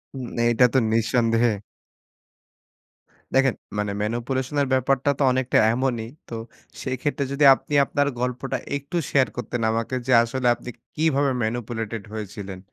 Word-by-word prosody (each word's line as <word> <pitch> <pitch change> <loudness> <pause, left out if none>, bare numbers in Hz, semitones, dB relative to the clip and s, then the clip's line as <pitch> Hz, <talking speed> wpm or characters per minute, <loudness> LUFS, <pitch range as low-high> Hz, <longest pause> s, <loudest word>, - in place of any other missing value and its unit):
উম 130 -2 -5 0.2
এইটা 120 +1 +5
তো - - +4
নিঃসন্দেহে। 115 0 +2 1.8
দেখেন, 135 -2 +4 0.2
মানে 105 -1 -1
manipulation 125 +5 -2
এর 140 - +1
ব্যাপারটা 130 +1 +2
তো - - +3
অনেকটা 130 0 +1 0.2
এমনই। 120 -3 -1 0.2
তো - - -9 0.5
সেক্ষেত্রে 135 +2 -2
যদি 140 +1 0
আপনি 150 - -9
আপনার 145 +1 0
গল্পটা 125 +1 -2 0.2
একটু 140 +5 -4
share 135 -2 +3
করতেন 120 0 -3
আমাকে 115 +3 -2
যে, 130 - +1
আসলে 125 +1 -2
আপনি 125 - -10 0.3
কিভাবে 145 -3 +2
manipulated 115 -1 -3
হয়েছিলেন? 100 -3 -6
125 Hz, 130 wpm, -24 LUFS, 115-135 Hz, 1.8 s, এইটা